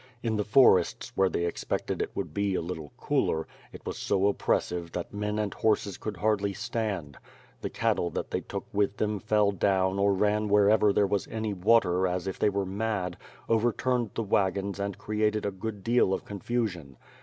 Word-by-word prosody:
In 115 -2 0
the 105 - 0
forests, 105 -5 +4
where 95 -1 +3
they 85 - -1
expected 85 - -2
it - - -1
would - - -4
be 100 -1 0
a - - 0
little 80 -4 -6
cooler, 80 0 0 0.3
it - - -12
was - - -4
so 95 0 +1
oppressive 90 -4 0
that 90 - -5
men 105 +1 -2
and 105 -2 -1
horses 105 -3 0
could 105 -3 -5
hardly 100 +1 +1
stand. 105 - -3 0.4
The - - -3
cattle 85 - 0
that - - -4
they - - -1
took - - -6
with 100 0 +1
them 105 -1 -1
fell 105 -1 +2
down 95 0 +1
or 100 0 +3
ran 105 +2 +1
where 105 0 +5
ever 105 -1 +4
there 100 +1 +3
was 100 0 -1
any 110 -2 -3
water 95 -2 +3
as 90 0 -2
if 95 - -4
they - - +3
were 100 -1 -1
mad, 95 -2 -2 0.3
overturned 120 +1 +1
the 115 - -1
wagons 100 -1 0
and 100 -1 -3
created 105 0 0
a 100 - 0
great 100 +1 -6
deal 115 -4 +3
of - - -8
confusion. 100 - -3
100 Hz, 190 wpm, -28 LUFS, 95-105 Hz, 0.4 s, where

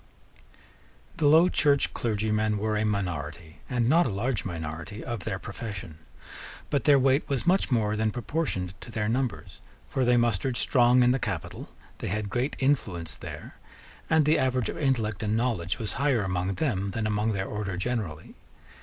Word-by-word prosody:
The 155 -3 +3
Low 160 +4 +7
Church 145 -5 +2
clergymen 110 -1 0
were 110 +1 -1
a 105 - +1
minority, 85 -5 -3
and 120 -3 +1
not 165 +5 +4
a - - -1
large 110 +4 -1
minority, 80 +4 -6
of 115 -4 -4
their 95 - -2
profession: 95 -6 -7 0.7
but 140 - 0
their 145 -2 +7
weight 135 +2 +2
was 140 +1 -1
much 185 +2 +3
more 110 -4 +1
than 110 0 +1
proportioned 110 - -2
to - - -10
their 110 -2 -2
numbers: 125 +2 -2 0.3
for 130 - -1
they 125 0 +4
mustered 120 +1 +1
strong 125 0 +4
in 125 - +5
the 135 - +1
capital: - - -4 0.3
they - - -4
had 105 +1 -2
great 125 +6 -1
influence 110 - 0
there; - - -9 0.5
and 160 -1 +4
the 155 +2 +4
average 130 -2 +1
of - - -5
intellect 115 -8 0
and 110 0 0
knowledge 110 -8 -1
was 110 -4 -2
higher 135 -6 +1
among 95 0 -1
them 100 - -1
than 110 +3 -2
among 105 +1 0
their 95 -1 -2
order 100 -3 -4
generally. 95 -7 -3
110 Hz, 170 wpm, -27 LUFS, 100-130 Hz, 0.7 s, Low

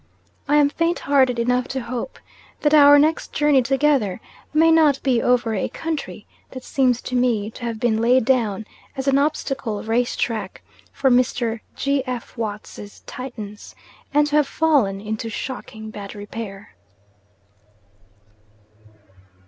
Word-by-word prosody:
I 295 - +3
am 295 -1 +5
faint 335 +3 0
hearted 260 -3 +2
enough 250 +2 +1
to 265 - -3
hope, 245 - -5 0.4
that 300 0 +2
our 290 -1 +8
next 310 +3 +1
journey 295 -3 +3
together, 265 -6 +1 0.3
may 320 +2 +4
not 310 -4 +4
be 250 -4 +2
over 245 -2 +2
a 200 - -1
country 280 - -5 0.2
that 255 -1 -9
seems 250 -3 +1
to 255 - -4
me 230 -4 +1
to 240 - -8
have 230 -2 -4
been 220 -2 +1
laid 245 +1 +3
down 220 -5 +1 0.3
as 265 +1 -4
an 275 0 +4
obstacle 270 -7 -2
race 235 +2 0
track 215 -5 -3 0.3
for 265 - +1
Mr. 240 -2 +1 0.2
G. 275 0 0
F. 250 -2 -5
Watts's 210 -2 -7
Titans, 220 -5 -8 0.4
and 295 +1 +3
to 295 0 +1
have 295 -2 +3
fallen 275 -12 +1
into 220 +2 -4
shocking 220 -2 -7
bad 200 -1 -8
repair. 205 -1 -8
250 Hz, 140 wpm, -22 LUFS, 220-280 Hz, 0.4 s, our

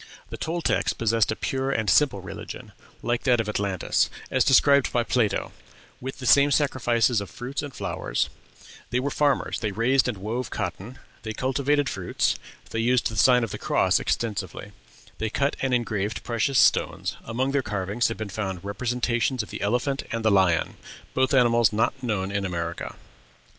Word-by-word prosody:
The - - -5
Toltecs 170 +1 0
possessed 115 -1 +1
a - - -1
pure 135 +3 -2
and 110 -6 -1
simple 120 -5 +3
religion, 90 - -8 0.3
like 120 0 0
that 125 -3 +4
of 110 - -1
Atlantis, 100 -3 0 0.2
as 130 -1 +3
described 140 0 +5
by 120 - +1
Plato, 115 -3 0 0.5
with 130 +1 -6
the 130 - -7
same 140 +3 +6
sacrifices 120 -5 +2
of 100 - -7
fruits 125 +8 -5
and 145 - -6
flowers; 95 -8 -2 0.6
they 125 - 0
were 140 +3 -2
farmers; 145 -3 +1
they 110 -3 -2
raised 125 +6 +2
and 120 -5 -2
wove 110 +5 -3
cotton; 95 +8 -5 0.2
they 110 -1 -5
cultivated 140 +4 +1
fruits; 95 -8 0 0.4
they 115 - -2
used 120 +2 +2
the 110 - -7
sign 125 +4 +5
of 115 - -3
the - - -5
Cross - - +2
extensively; 100 -3 -3 0.5
they 110 - -1
cut 140 +5 0
and 135 - 0
engraved 110 -4 -1
precious 120 +3 0
stones; - - +2
among 130 +4 -1
their 140 0 +1
carvings 105 +1 -1
have 115 - -4
been 110 - -4
found 95 -2 -4
representations 120 +3 -1
of - - -12
the - - -6
elephant 125 +6 0
and 115 -1 -3
the 110 - +5
lion, 95 -4 +2 0.4
both 130 0 +2
animals 120 -3 +4
not 110 +1 +1
known 105 -6 -2
in 100 0 -1
America. 85 -2 -4
115 Hz, 175 wpm, -25 LUFS, 105-130 Hz, 0.6 s, same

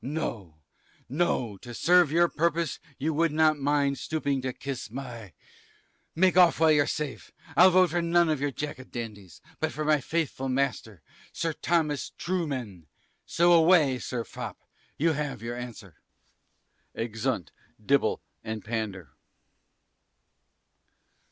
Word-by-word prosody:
No, 120 - -4 0.5
no; 130 - -1
to 120 +3 -10
serve 175 0 +4
your 170 +2 +4
purpose 170 0 -1 0.2
you 155 +3 -1
would 165 +1 +2
not 155 -1 +3
mind 140 -1 +1
stooping 145 -4 -1
to 130 0 -2
kiss 135 -2 -6
my, 115 -5 -8 0.8
make 185 +2 +3
off 180 -4 +6
while 160 -1 +5
you're 145 -1 +4
safe. 150 -3 -4 0.2
I'll 185 +2 +8
vote 185 -2 +4
for 175 +1 +1
none 170 0 +3
of 155 -3 0
your 145 - +1
Jack 145 0 -5
a - - -8
Dandy's, 105 -8 -8 0.2
but 160 0 -1
for 155 - -4
my 150 -1 +3
faithful 145 -3 -2
master, 130 - -2 0.3
Sir 165 -1 -2
Thomas 155 -3 0
Trueman 130 - -3 0.4
so 175 +1 +3
away, 160 -6 +5
Sir 120 0 -3
Fop, - - -7 0.4
you 165 +3 +2
have 145 -7 -3
your 120 +1 -4
answer. 120 -8 -9 1.0
_Exeunt 115 - -2 0.4
Dibble - - +2 0.2
and 110 -1 -5
Pander. 105 - -4
145 Hz, 135 wpm, -27 LUFS, 120-165 Hz, 1.0 s, I'll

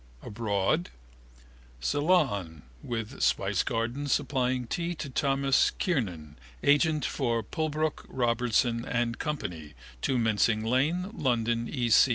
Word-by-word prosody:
Abroad? 110 - 0 0.9
Ceylon 100 - +1 0.2
(with 115 -3 -5
spicegardens 120 +6 0
supplying 130 -3 0
tea 170 +8 -2
to 140 -3 -6
Thomas 135 0 +2
Kernan, 90 - -2 0.2
agent 150 +1 +3
for 115 -4 0
Pulbrook, 155 +4 -2
Robertson 120 -1 +1
and 120 -2 -1
Co, 150 -1 -1 0.7
2 130 - +1
Mincing 110 -1 +2
Lane, 155 - +1
London, 120 -3 0
E. 120 -5 -1
125 Hz, 100 wpm, -28 LUFS, 115-145 Hz, 0.9 s, agent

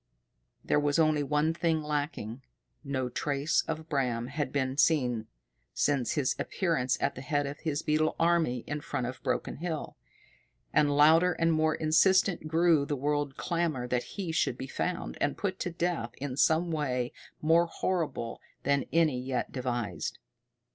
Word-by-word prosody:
There - - +3
was 145 0 +1
only 155 -2 +3
one 150 +3 +1
thing 165 -2 0
lacking. 145 -6 -3 0.4
No 130 -3 -2
trace 140 +4 0
of 160 0 -4
Bram 125 -5 -1
had 145 -1 -2
been 135 -2 -1
seen 125 -8 +2 0.5
since 140 -5 +1
his 145 -4 +1
appearance 160 -9 0
at - - 0
the 130 - -8
head 145 +1 0
of 140 +1 -6
his 155 -2 -2
beetle 155 +1 +1
army 165 -8 +2
in 150 0 -4
front 140 -4 -3
of 125 +1 -6
Broken 130 -3 -2
Hill. 160 -1 -4 0.8
And 145 -1 +3
louder 165 +4 +6
and 165 0 +2
more 155 0 +2
insistent 170 +2 +3
grew 165 -1 +4
the 145 +1 -2
world 145 0 -1
clamor 165 -8 -1
that 125 +9 -2
he 185 -5 -2
should 130 -6 0
be - - -5
found, 180 +6 -3
and 145 - 0
put 190 -2 -2
to 180 - -2
death 170 -8 -2
in 135 -2 -4
some 160 +4 +3
way 130 -6 -1 0.3
more 165 +2 +4
horrible 165 -9 -2 0.2
than 140 -1 +1
any 155 -6 +2
yet 130 -1 -2
devised. 120 -4 -3
150 Hz, 160 wpm, -29 LUFS, 130-165 Hz, 0.8 s, louder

